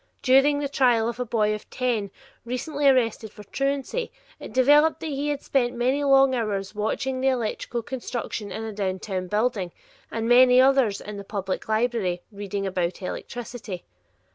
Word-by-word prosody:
During 270 +3 +5
the 285 0 -1
trial 245 -5 +3
of 235 +1 -4
a 250 - -1
boy 215 -2 +1
of 215 - -7
ten 235 -6 -1 0.3
recently 280 +4 -1
arrested 230 -4 +1
for 210 - -12
truancy, 275 - -2 0.3
it - - -9
developed 295 +5 +4
that - - -5
he 280 +1 -2
had 290 -1 -3
spent 245 -3 0
many 260 +4 +1
hours 250 -8 +2
watching 255 +5 -2
the 265 - +2
electrical 240 -1 -1
construction 240 -5 -5
in 220 - -5
a 220 -1 -5
downtown 190 -1 -3
building, 210 -2 0 0.4
and 225 0 -3
many 250 +1 +7
others 260 -6 +4
in 210 0 -7
the 200 - -7
public 195 0 -4
library 215 -6 0
"reading 200 -1 -4
about 185 -2 -2
electricity." 225 -2 -6
235 Hz, 160 wpm, -25 LUFS, 210-265 Hz, 0.4 s, many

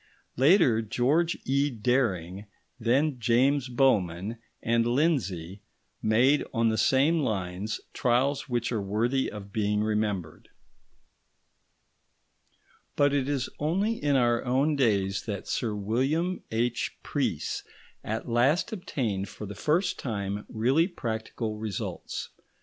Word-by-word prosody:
Later, 135 - +5
George 140 +10 +1
E. 140 +2 +2
Dering, 105 -6 -1 0.3
then 130 +4 +1
James 130 +3 +2
Bowman 110 -5 +1 0.2
and 115 0 +2
Lindsay, 105 - 0 0.4
made 125 +7 +3
on 115 -2 +2
the 110 - 0
same 140 +8 +3
lines 100 -4 -2
trials 130 +4 +1
which 120 -1 -1
are 110 -4 -1
worthy 115 +7 0
of 100 -1 -9
being 105 -1 +1
remembered. 105 -6 -2 2.5
But 145 -1 +3
it 140 -1 0
is 135 -3 -1
only 190 +9 +1
in 145 -1 +3
our 120 -2 +2
own 135 +5 +2
days 100 -7 +1
that 100 -3 -4
Sir 110 -3 -1
William 135 - 0
H. 120 +2 -1
Preece - - -2 0.4
at 110 +1 -4
last 135 - +2
obtained 110 - -2
for 105 - -8
the 100 - -7
first 160 - 0
time 100 -4 -3
really 130 +9 +2
practical 110 - -4
results. 105 -3 -5
120 Hz, 115 wpm, -28 LUFS, 105-140 Hz, 2.5 s, Later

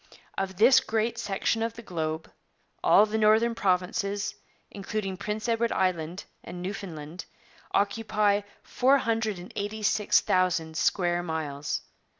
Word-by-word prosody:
Of 190 -1 -3
this 235 +4 +7
great 225 +1 -1
section 205 +3 -1
of 230 0 -2
the 235 - -10
globe, 160 -4 -4 0.5
all 210 - +6
the 220 +1 -2
northern 220 +2 +4
provinces, 200 +1 0 0.4
including 200 -1 -4
Prince 210 +3 -4
Edward 230 0 +1
Island 180 -2 -1 0.2
and 175 - -8
Newfoundland, 175 -4 -6 0.5
occupy 205 0 +2
but 205 - -24
486,000 205 -7 +1
square 175 +1 +1
miles. 150 -4 -3
200 Hz, 110 wpm, -27 LUFS, 180-220 Hz, 0.5 s, this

